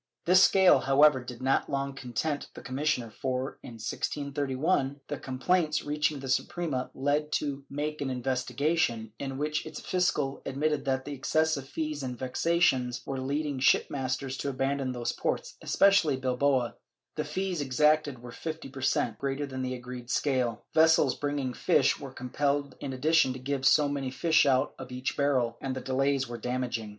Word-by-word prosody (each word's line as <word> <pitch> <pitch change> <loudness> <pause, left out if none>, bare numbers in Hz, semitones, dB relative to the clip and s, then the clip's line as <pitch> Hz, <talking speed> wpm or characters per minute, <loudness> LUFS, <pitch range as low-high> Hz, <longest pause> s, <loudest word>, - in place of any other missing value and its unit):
This 180 +2 +6
scale, 190 -1 +6
however, 135 -1 +4
did 125 0 -8
not 135 +1 +1
long 140 0 -2
content 135 +3 -3
the - - -10
commissioner 130 -2 -1
for, 130 +3 -3
in 120 - -10
1631, 140 +4 -1
the 145 - -3
complaints 155 +5 0
reaching 150 0 0
the 135 - -7
Suprema 130 0 -1
led 145 +3 +1
it 150 - -22
to 140 -2 -2
make 150 +2 -3
an 140 - -1
investigation, 130 -2 -1
in 135 -1 -4
which 150 +2 -1
its 155 -1 -7
fiscal 150 -7 0
admitted 145 +1 -1
that 130 -1 0
the 145 - -5
excessive 150 0 0
fees 155 -1 -3
and 125 -2 -4
vexations 130 -2 +1
were 135 -1 -3
leading 140 +1 -2
shipmasters 130 0 +1
to 140 - -2
abandon 135 0 -1
those 120 -1 -2
ports, - - -3
especially 195 -8 +4
Bilbao; 130 -1 +1 0.4
the - - -2
fees 185 -4 -2
exacted 145 -1 +2
were 120 - -8
fifty 160 +2 -6
per 135 0 -9
cent, 115 -4 0
greater 140 +1 -2
than 130 -2 -5
the 130 0 -2
agreed 125 0 -8
scale; 125 -5 0
vessels 160 -4 +5
bringing 145 -3 -2
fish - - +2
were - - -7
compelled 140 +2 -1
in 140 - -4
addition 135 0 +3
to 130 - -8
give 135 +1 0
so 145 +2 +5
many 140 -2 -2
fish 160 +3 +3
out 130 +1 +2
of 130 -1 -8
each 125 +1 -3
barrel, 130 -5 +1
and 135 -1 -3
the - - -3
delays 135 +1 0
were 120 0 -6
damaging. 125 -3 -2
135 Hz, 170 wpm, -29 LUFS, 130-150 Hz, 0.4 s, This